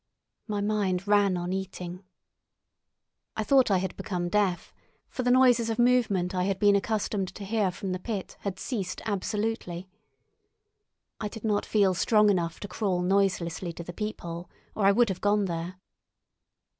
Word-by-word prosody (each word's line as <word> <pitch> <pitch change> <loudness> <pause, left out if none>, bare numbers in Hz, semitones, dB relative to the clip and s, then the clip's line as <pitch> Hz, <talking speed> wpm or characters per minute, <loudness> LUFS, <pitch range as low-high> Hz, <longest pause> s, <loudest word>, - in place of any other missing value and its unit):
My 205 -2 -2
mind 200 -3 0
ran 205 -3 +4
on 175 +1 -3
eating. 185 -1 -5 1.3
I 220 - 0
thought 260 +3 +4
I 195 - +4
had 185 0 -3
become 180 -5 -3
deaf, 195 -3 0 0.3
for - - -4
the 250 - +1
noises 245 -2 +5
of 225 - -1
movement 235 -7 +2
I 180 -1 0
had 195 -1 0
been 205 0 +4
accustomed 200 -1 -1
to 200 - -7
hear 210 -1 +1
from 185 +1 -5
the 185 - -2
pit 200 -1 -5
had 195 -2 -4
ceased 205 -8 -4
absolutely. 205 -3 -2 1.3
I 215 - -2
did 215 +1 -9
not 210 -2 0
feel 200 -3 +3
strong 210 +3 +4
enough 170 -3 -1
to 205 - -5
crawl 185 -2 -1
noiselessly 180 -3 0
to 170 - -7
the 175 - -8
peephole, 175 -4 -5 0.2
or 200 -2 +2
I - - +7
would 235 +2 +3
have 190 - -4
gone 205 0 +2
there. 170 0 -4
200 Hz, 165 wpm, -28 LUFS, 180-215 Hz, 1.3 s, I